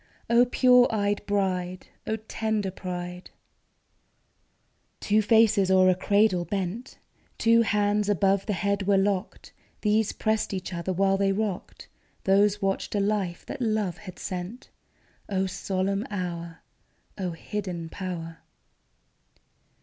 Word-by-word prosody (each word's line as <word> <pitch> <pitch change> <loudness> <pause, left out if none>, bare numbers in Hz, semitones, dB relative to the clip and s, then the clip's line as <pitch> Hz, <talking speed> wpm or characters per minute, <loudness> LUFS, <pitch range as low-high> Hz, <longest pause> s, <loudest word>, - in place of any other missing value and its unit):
O 240 +1 +6
pure 250 0 +5
eyed 205 -2 0
bride! 185 -3 -1 0.2
O 220 - 0
tender 220 -2 -2
pride! 180 -1 -6 1.7
Two 215 +1 +2
faces 215 -2 +4
o'er 185 0 +5
a - - +1
cradle 200 -1 +2
bent: 200 +5 -4 0.4
Two 230 0 +4
hands 210 -1 +1
above 195 0 +2
the 210 - 0
head 200 0 -1
were 200 -1 +4
locked; 195 0 -2 0.3
These 215 0 +2
pressed 220 -2 -1
each 185 0 -5
other 170 +2 -3
while 195 +1 +2
they 195 0 +2
rocked, 200 -2 -4 0.4
Those 200 +1 +3
watched 195 +2 -1
a - - +2
life 200 -4 -1
that - - -7
love 215 -6 -1
had 185 -4 -10
sent. 185 +6 -6 0.6
O 190 -1 0
solemn 190 +2 -2
hour! 170 -4 -5 0.6
O 180 -3 -2
hidden 180 -1 -5
power 165 -2 -6
195 Hz, 125 wpm, -26 LUFS, 185-210 Hz, 1.7 s, O